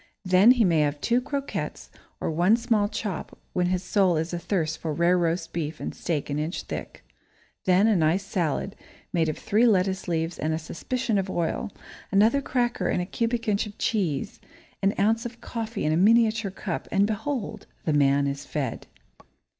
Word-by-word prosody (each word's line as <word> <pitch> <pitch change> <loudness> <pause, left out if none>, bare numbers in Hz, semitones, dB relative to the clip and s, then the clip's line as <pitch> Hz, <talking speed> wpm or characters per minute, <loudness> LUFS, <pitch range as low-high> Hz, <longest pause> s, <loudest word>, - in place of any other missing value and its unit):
Then 185 +4 +6
he 240 -4 +3
may 170 -3 +3
have 145 -1 +1
two 240 +7 +2
croquettes, 280 +1 -4 0.3
or - - -2
one 175 +8 +4
small 225 -4 +1
chop, 205 -6 -5 0.2
when 180 -1 +1
his 185 0 0
soul 185 -2 +2
is 160 +3 -2
athirst 170 -2 -1
for 155 -2 -3
rare 170 +2 +3
roast 170 -1 -1
beef 155 -2 -3
and - - -4
steak 155 -5 -2
an 145 0 -2
inch 155 +4 -3
thick. - - -7 0.6
Then 185 +1 +4
a 220 -2 +4
nice 170 +3 +2
salad, 185 +1 -1 0.4
made 165 -3 +2
of 155 - -3
three 225 +4 +3
lettuce 190 -3 +1
leaves 165 0 -1
and 155 0 0
a - - -1
suspicion 220 +7 -2
of 190 0 -3
oil, 170 +3 -2 0.4
another 220 +8 +4
cracker 240 -8 0
and - - +1
a 180 - -1
cubic 230 +4 -2
inch 210 0 +1
of 205 - -11
cheese, 185 -6 -1 0.4
an 195 +1 +2
ounce 220 +3 +2
of 240 0 -13
coffee 230 -1 -4
in 155 - +2
a - - +2
miniature 220 +1 +4
cup, 190 -1 -5
and 195 +1 +4
behold, 220 +3 -3 0.2
the 155 - +1
man 140 -1 +3
is 140 0 -3
fed! 135 -4 -4
185 Hz, 185 wpm, -26 LUFS, 165-220 Hz, 0.6 s, Then